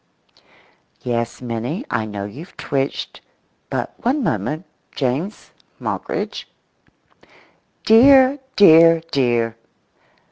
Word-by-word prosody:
[Yes, 120 Hz, 0 st, -3 dB
Minnie; 125 Hz, -, -4 dB
I 110 Hz, -, -1 dB
know 100 Hz, -1 st, -5 dB
you've 145 Hz, -, -11 dB
twitched, 135 Hz, 0 st, -3 dB, 0.5 s
but -, -, -3 dB
one 265 Hz, +4 st, -1 dB
moment—James 145 Hz, -, -4 dB, 0.3 s
Moggridge]."Dear, 265 Hz, +4 st, 0 dB, 0.2 s
dear, 165 Hz, -3 st, +7 dB
dear!" 120 Hz, -4 st, 0 dB
140 Hz, 70 wpm, -20 LUFS, -, 0.5 s, dear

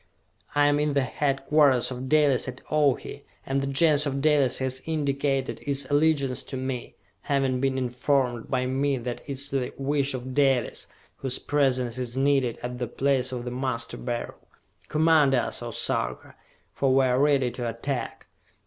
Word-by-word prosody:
I 145 Hz, 0 st, +4 dB
am 145 Hz, 0 st, +3 dB
in 150 Hz, -1 st, 0 dB
the 140 Hz, -, +3 dB
headquarters 135 Hz, 0 st, +2 dB
of 130 Hz, +1 st, -5 dB
Dalis 145 Hz, -4 st, +3 dB
at 125 Hz, 0 st, -6 dB
Ohi, 145 Hz, -4 st, 0 dB, 0.2 s
and 135 Hz, +1 st, 0 dB
the 135 Hz, -, -2 dB
Gens 150 Hz, +1 st, +3 dB
of 140 Hz, 0 st, -2 dB
Dalis 145 Hz, -3 st, +3 dB
has 130 Hz, 0 st, -2 dB
indicated 140 Hz, -5 st, -1 dB
its 140 Hz, -1 st, -1 dB
allegiance 145 Hz, -4 st, +2 dB
to 135 Hz, -, -6 dB
me, 130 Hz, -1 st, -4 dB, 0.3 s
having 135 Hz, -2 st, 0 dB
been 135 Hz, -1 st, 0 dB
informed 125 Hz, -1 st, 0 dB
by 130 Hz, -1 st, 0 dB
me 135 Hz, +2 st, 0 dB
that 120 Hz, 0 st, -4 dB
it -, -, -17 dB
is 140 Hz, +1 st, -3 dB
the 135 Hz, -2 st, -1 dB
wish 140 Hz, 0 st, 0 dB
of 130 Hz, +1 st, -6 dB
Dalis, 135 Hz, -3 st, +1 dB, 0.3 s
whose 130 Hz, -2 st, -1 dB
presence 130 Hz, -4 st, 0 dB
is 125 Hz, 0 st, -4 dB
needed 135 Hz, -3 st, +2 dB
at 125 Hz, 0 st, -5 dB
the 125 Hz, -, -2 dB
place 135 Hz, +1 st, 0 dB
of 125 Hz, -1 st, -5 dB
the 125 Hz, -, -4 dB
Master 125 Hz, -2 st, -3 dB
Beryl! 120 Hz, -1 st, -5 dB, 0.5 s
Command 155 Hz, -3 st, +4 dB
us, 120 Hz, -, -1 dB
O -, -, -5 dB
Sarka, -, -, -2 dB, 0.4 s
for 135 Hz, -1 st, +1 dB
we 135 Hz, 0 st, +4 dB
are 125 Hz, 0 st, +2 dB
ready 140 Hz, -3 st, +3 dB
to 120 Hz, -1 st, -3 dB
attack!" 115 Hz, +1 st, -4 dB
135 Hz, 170 wpm, -26 LUFS, 125-140 Hz, 0.5 s, I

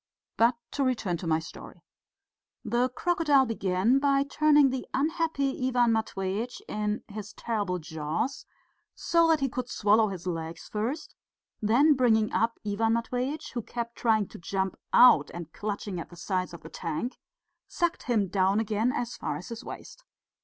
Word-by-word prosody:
But 235 Hz, +2 st, +4 dB, 0.2 s
to 280 Hz, -, -1 dB
return 225 Hz, -9 st, 0 dB
to 170 Hz, -, -6 dB
my 160 Hz, -1 st, +3 dB
story. 160 Hz, 0 st, -10 dB, 0.8 s
The 240 Hz, +3 st, +1 dB
crocodile 295 Hz, -2 st, +2 dB
began 220 Hz, +2 st, +1 dB
by 275 Hz, -1 st, +3 dB
turning 295 Hz, -1 st, +4 dB
the 260 Hz, -1 st, -4 dB
unhappy 315 Hz, -1 st, 0 dB, 0.2 s
Ivan 245 Hz, -2 st, +3 dB
Matveitch 220 Hz, +1 st, -2 dB
in 210 Hz, 0 st, -2 dB
his 210 Hz, -1 st, -8 dB
terrible 205 Hz, -6 st, -2 dB
jaws 160 Hz, -, -3 dB, 0.5 s
so 335 Hz, -1 st, +3 dB
that 320 Hz, -3 st, +3 dB
he 270 Hz, -, +2 dB
could 250 Hz, -1 st, -4 dB
swallow 215 Hz, +1 st, +3 dB
his 185 Hz, -3 st, -6 dB
legs 165 Hz, -2 st, -4 dB
first; 255 Hz, +9 st, -3 dB, 0.5 s
then 250 Hz, +9 st, +5 dB
bringing 225 Hz, -5 st, +2 dB
up 230 Hz, +1 st, +1 dB
Ivan 220 Hz, +2 st, +1 dB
Matveitch, 250 Hz, +5 st, -2 dB
who 240 Hz, -, -2 dB
kept 235 Hz, +1 st, -5 dB
trying 220 Hz, -4 st, +2 dB
to -, -, -11 dB
jump 190 Hz, +2 st, -2 dB, 0.2 s
out 200 Hz, -, +7 dB
and 170 Hz, -2 st, -8 dB
clutching 205 Hz, -3 st, -4 dB
at 165 Hz, -, -7 dB
the 175 Hz, -, -13 dB
sides 185 Hz, +1 st, -2 dB
of 170 Hz, -, -12 dB
the -, -, -9 dB
tank, 165 Hz, -, -4 dB, 0.5 s
sucked 345 Hz, 0 st, -1 dB
him 215 Hz, -5 st, +2 dB
down 190 Hz, +2 st, +2 dB
again 220 Hz, +2 st, +1 dB
as 245 Hz, -3 st, -3 dB
far -, -, -3 dB
as -, -, -9 dB
his 230 Hz, -1 st, -7 dB
waist. -, -, -10 dB
225 Hz, 160 wpm, -28 LUFS, 195-260 Hz, 0.8 s, out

